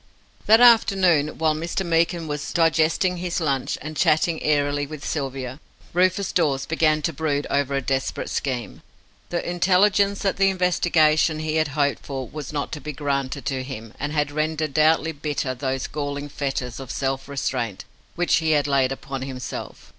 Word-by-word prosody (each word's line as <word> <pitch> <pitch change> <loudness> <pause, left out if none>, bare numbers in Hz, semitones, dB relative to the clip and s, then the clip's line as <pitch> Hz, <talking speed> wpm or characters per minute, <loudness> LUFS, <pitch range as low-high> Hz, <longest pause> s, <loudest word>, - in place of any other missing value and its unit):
That 220 +1 +7
afternoon, 190 -10 +5
while 160 -1 +2
Mr. 170 +4 -3
Meekin 170 0 +1
was 150 0 -4
digesting 165 +2 +2
his 180 0 -2
lunch, 140 -6 -1
and 155 +1 -6
chatting 160 +3 +2
airily 145 -1 +1
with 150 -1 -8
Sylvia, 135 -2 -4 0.3
Rufus 185 +2 +2
Dawes 145 -6 +1
began 155 -2 +1
to 165 - 0
brood 145 -1 -1
over 140 -1 +1
a 135 - -1
desperate 135 +1 -2
scheme. 120 - -3 0.5
The 175 - -2
intelligence 195 +3 +2
that 195 - 0
the 195 0 +4
investigation 170 -4 +2
he 155 0 -1
had 155 -1 +2
hoped 145 -1 +1
for 135 -3 -5
was 150 -3 -7
not 145 -2 -3
to 150 - -6
be 150 - -5
granted 140 -2 -2
to 130 +3 -1
him 115 -4 -8
had 150 0 -1
rendered 155 0 -1
doubly 155 +2 +3
bitter 145 -3 -3
those 130 0 -3
galling 145 -1 -4
fetters 135 -4 -3
of 135 -3 -8
self 135 0 -2
restraint 125 -7 -3 0.3
which 175 0 +2
he 160 -1 +2
had 145 -1 +2
laid 135 -2 +2
upon 135 0 -5
himself. 130 -2 -7
150 Hz, 165 wpm, -23 LUFS, 135-165 Hz, 0.5 s, That